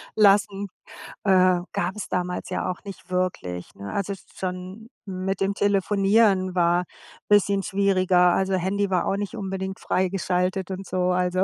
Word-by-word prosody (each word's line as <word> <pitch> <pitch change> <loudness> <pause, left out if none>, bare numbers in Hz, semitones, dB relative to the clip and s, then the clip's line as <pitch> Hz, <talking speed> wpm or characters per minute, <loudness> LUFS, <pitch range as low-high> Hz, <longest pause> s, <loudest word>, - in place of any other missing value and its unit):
lassen. 200 -1 +4 0.6
Äh, 185 -2 +4
gab 180 +3 -1
es 210 - -5
damals 180 0 -3
ja - - -1
auch 180 - -5
nicht 195 -2 -10
wirklich, 175 - -3
ne? 100 +1 -7
Also 200 0 -2 0.2
schon 185 +4 -6 0.2
mit 190 0 -3
dem 195 +1 +1
Telefonieren 195 -1 +2
war 175 0 +3 0.4
bisschen 200 -1 +3
schwieriger. 185 -2 +3
Also, 190 0 0
Handy 190 +2 0
war 180 - +1
auch 195 - 0
nicht 205 -1 -4
unbedingt 190 -1 -4
freigeschaltet 185 0 0
und 190 +1 -5
so, 180 0 0
also, 180 +1 +1
190 Hz, 145 wpm, -24 LUFS, 180-200 Hz, 0.6 s, lassen